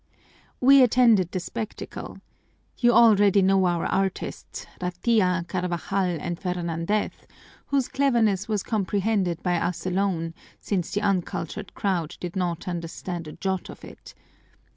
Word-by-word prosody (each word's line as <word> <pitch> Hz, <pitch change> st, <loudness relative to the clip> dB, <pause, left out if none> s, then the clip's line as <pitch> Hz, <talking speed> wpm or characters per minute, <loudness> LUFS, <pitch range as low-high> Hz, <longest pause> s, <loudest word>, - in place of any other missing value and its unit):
"We 270 Hz, +2 st, +7 dB
attended 235 Hz, -7 st, +4 dB
the 185 Hz, -, -2 dB
spectacle. 215 Hz, +4 st, -6 dB, 0.6 s
You 240 Hz, -1 st, +5 dB
already 205 Hz, -4 st, +5 dB
know 190 Hz, -1 st, +4 dB
our 175 Hz, -1 st, 0 dB
artists, 195 Hz, -1 st, -3 dB, 0.2 s
Ratia, 180 Hz, 0 st, +1 dB
Carvajal, 180 Hz, 0 st, -1 dB
and 175 Hz, +2 st, -4 dB
Fernandez, 180 Hz, +2 st, -1 dB, 0.6 s
whose 275 Hz, -3 st, +1 dB
cleverness 225 Hz, -8 st, +1 dB
was 210 Hz, -3 st, -1 dB
comprehended 200 Hz, -4 st, 0 dB
by 175 Hz, -1 st, +1 dB
us 175 Hz, +1 st, -2 dB
alone, 180 Hz, -3 st, -1 dB, 0.3 s
since 185 Hz, -5 st, -2 dB
the 205 Hz, -, -1 dB
uncultured 185 Hz, -5 st, -2 dB
crowd 175 Hz, -6 st, -2 dB
did 175 Hz, 0 st, -6 dB
not 180 Hz, -1 st, -2 dB
understand 170 Hz, 0 st, -5 dB
a 155 Hz, -, -8 dB
jot 190 Hz, -2 st, -3 dB
of -, -, -10 dB
it. -, -, -13 dB
190 Hz, 125 wpm, -25 LUFS, 175-210 Hz, 0.6 s, We